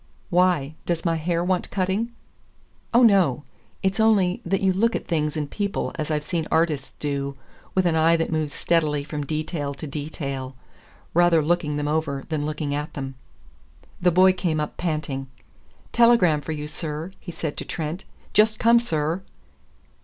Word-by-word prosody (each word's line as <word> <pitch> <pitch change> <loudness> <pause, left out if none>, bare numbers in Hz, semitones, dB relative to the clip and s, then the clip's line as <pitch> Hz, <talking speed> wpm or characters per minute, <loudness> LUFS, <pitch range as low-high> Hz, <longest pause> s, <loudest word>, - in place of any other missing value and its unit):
"Why? 175 -5 +3
Does 170 0 -1
my 165 -1 +2
hair 170 +1 0
want 180 0 0
cutting?" 195 +5 -1 0.8
"Oh, 240 +1 +5
no! 185 - +4 0.4
It's 195 +2 +1
only 205 -5 +3
that 190 +2 0
you 190 -1 +3
look 230 +5 +2
at - - -3
things 150 -2 -1
and 150 -1 -2
people 200 +6 -2
as 155 - -4
I've 150 -1 0
seen 165 0 -2
artists 160 -5 0
do, 140 -1 -2 0.4
with 185 -1 +3
an 170 -2 +2
eye 160 +1 +5
that 165 0 -1
moves 155 -2 -1
steadily 150 -4 +1
from 150 0 -4
detail 155 -2 -3
to 155 - -7
detail 140 -3 -4 0.6
rather 170 -2 +4
looking 155 -2 0
them 145 0 -1
over 150 -3 -1
than 150 -2 -1
looking 150 -1 -2
at 150 +1 -4
them." 135 -1 -4 0.9
The 180 - +5
boy 185 +2 +6
came 175 -4 -1
up 150 - -3
panting. 150 -5 -2 0.6
"Telegram 230 -11 +5
for 145 - -5
you, 150 -1 -4
sir," 155 +2 -5
he 175 - -8
said 160 -3 -4
to - - -3
Trent. 160 +3 -4 0.3
"Just 215 +1 +4
come, 235 +1 +5
sir." 165 -5 -1
160 Hz, 170 wpm, -24 LUFS, 150-180 Hz, 0.9 s, boy